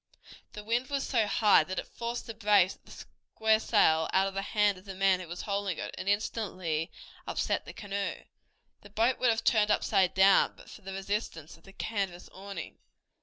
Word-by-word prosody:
The 210 - -8
wind 235 +4 0
was 280 -1 -2
so 225 -5 +1
high 205 -3 +4
that 185 +4 -6
it - - -2
forced 235 +1 -5
the 230 - -6
brace 205 -4 +3
of - - -25
the - - -16 0.5
square 220 0 +4
sail 160 -8 +3
out 190 0 +3
of 195 - -3
the 195 - -2
hand 205 -1 +1
of 185 - -20
the 195 -1 -8
man 190 -1 +3
who 180 - -8
was 175 +2 -6
holding 200 -4 -2
it, - - -5
and 195 - -4
instantly 185 -6 -1 0.4
upset - - -1
the - - -8
canoe. 200 -1 -4 0.6
The 205 - -14
boat 230 +5 +1
would 250 - +3
have 225 0 +1
turned 215 -2 +3
upside 195 -3 +2
down 195 +1 +5
but - - -14
for - - -12
the 195 -1 -8
resistance 195 -5 -4
of 165 - -22
the 195 - -15
canvas 195 -4 -4
awning. 190 -2 -8
200 Hz, 205 wpm, -29 LUFS, 185-215 Hz, 0.6 s, down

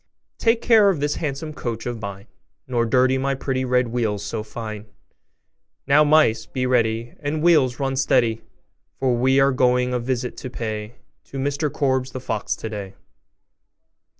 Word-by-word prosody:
'Take 230 0 +2
care 220 -4 +6
of 180 -6 0
this 145 +1 -1
handsome 155 +1 -4
coach 115 -6 -5
of 120 -2 -4
mine, 100 -1 -7 0.4
Nor 120 -2 0
dirty 130 +2 +3
my 135 +1 0
pretty 130 -1 -2
red 125 -1 +1
wheels 110 -4 -1
so 110 +1 -3
fine! 110 -1 -7 1.0
Now, 145 +2 +5
mice, 150 -6 +3
be 130 -1 -2
ready, 115 -2 0
And, 150 +1 -2
wheels, 150 -7 +4
run 135 -1 -1
steady! 125 -4 +2 0.6
For 130 -2 +1
we 130 +3 +3
are 135 0 +4
going 125 -1 +2
a 125 - 0
visit 125 0 -3
to 130 - -6
pay 110 -2 -5 0.3
To 135 - -9
Mr 145 +2 -1
Korbes, 130 -2 0
the 130 - -4
fox, 130 - -2
today. 100 -3 -6
130 Hz, 160 wpm, -22 LUFS, 115-140 Hz, 1.0 s, care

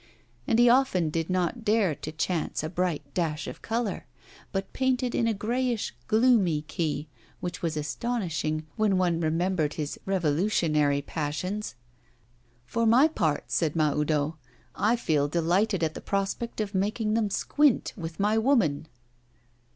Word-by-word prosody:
And 225 - +3
he 240 +1 +6
often 235 - +3
did 165 +1 -2
not 185 +6 -1
dare 210 -6 +2
to 155 - -7
chance 160 0 -2
a 155 - -2
bright 180 -3 -1
dash 160 -3 -1
of - - -8
colour, 230 -2 -2 0.4
but 195 0 -3
painted 255 -1 0
in 230 - +1
a 225 - +2
greyish 240 +2 -1
gloomy 215 -10 +3
key 155 -1 -3 0.3
which 175 -1 -5
was 160 -2 -1
astonishing, 155 - -2
when 210 -3 +2
one 175 -2 +1
remembered 165 -1 0
his 150 -2 -4
revolutionary 155 -5 +1
passions. 165 +8 -3 0.9
'For 230 - 0
my 250 +7 +6
part,' 165 - -1
said 160 -2 +1
Mahoudeau, 150 0 +1 0.4
'I 220 +3 +2
feel 155 -10 +1
delighted 175 +4 +1
at 155 -1 0
the - - -8
prospect 200 +4 -2
of 205 -1 -4
making 215 +3 0
them 220 -2 +1
squint 290 +6 +2
with 165 -2 -7
my 210 +2 +2
woman. 215 - +2
180 Hz, 145 wpm, -27 LUFS, 155-220 Hz, 0.9 s, he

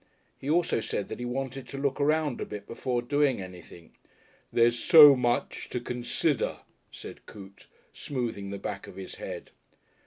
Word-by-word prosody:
He 135 - -5
also 175 -2 +2
said 100 - -3
that - - -6
he 125 - -4
wanted 135 +1 -4
to 140 - -7
look 140 0 -1
around 150 -2 +1
a - - -2
bit 105 -1 -7
before 120 +1 -2
doing 145 -1 +1
anything. 90 -2 -11 0.6
"There's 120 0 +3
so 150 -5 +9
much 120 -1 -1
to 125 - -2
consider," 125 +3 -1 0.3
said - - -11
Coote, 100 -1 -13 0.3
smoothing 120 -7 -4
the 100 - -5
back - - -6
of - - -11
his 95 -1 -8
head. - - -7
125 Hz, 160 wpm, -28 LUFS, 105-140 Hz, 0.6 s, so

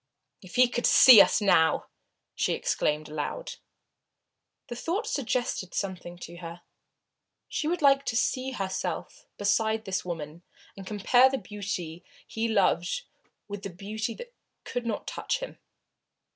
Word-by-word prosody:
"If 185 -3 -13
he 250 0 +6
could 240 0 0
see 245 -6 +9
us - - +3
now!" 180 -5 +3 0.5
she - - 0
exclaimed 150 0 -1
aloud. 155 - -5 1.1
The 240 - -6
thought 360 - -2
suggested 240 -8 -2
something 180 -3 -4
to 170 +1 -9
her. 170 0 -9 0.8
She 305 - -3
would 340 -1 -1
like 275 -1 +5
to 225 - -2
see 255 +2 0
herself 195 -7 -4
beside 220 +2 +1
this 190 0 -1
other 180 - -9
woman 160 0 -6 0.3
and 195 -1 -10
compare 245 +5 +4
the 270 - -2
beauty 185 -5 -6 0.2
he 225 +1 -2
loved 195 - +1 0.4
with 205 -1 -6
the 195 - -5
beauty 215 +5 -5
that 485 0 -11 0.3
could 245 -1 -4
not 220 - -3
touch - - -2
him. - - -8
205 Hz, 145 wpm, -27 LUFS, 180-250 Hz, 1.1 s, see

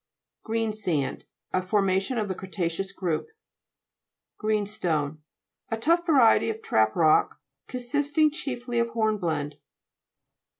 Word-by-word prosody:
GREENSAND 215 - -1 0.3
A 185 - +2
formation 195 +4 +1
of 215 -2 0
the 190 - -2
cre 190 +1 -9
ta'ceous 185 +1 -2
group 180 -5 -2
(p. 445 - -30
70). - - -47 1.0
GREENSTONE 180 -9 -1 0.5
A 225 - -1
tough 335 +9 +2
variety 255 -7 +5
of 220 0 -5
trap 110 0 +2
rock, 155 -2 +3 0.3
consisting 290 +5 +1
chiefly 250 -6 -3
of 235 0 +1
horn 220 -2 0
blende. 150 -5 -2
215 Hz, 125 wpm, -26 LUFS, 175-240 Hz, 1.0 s, variety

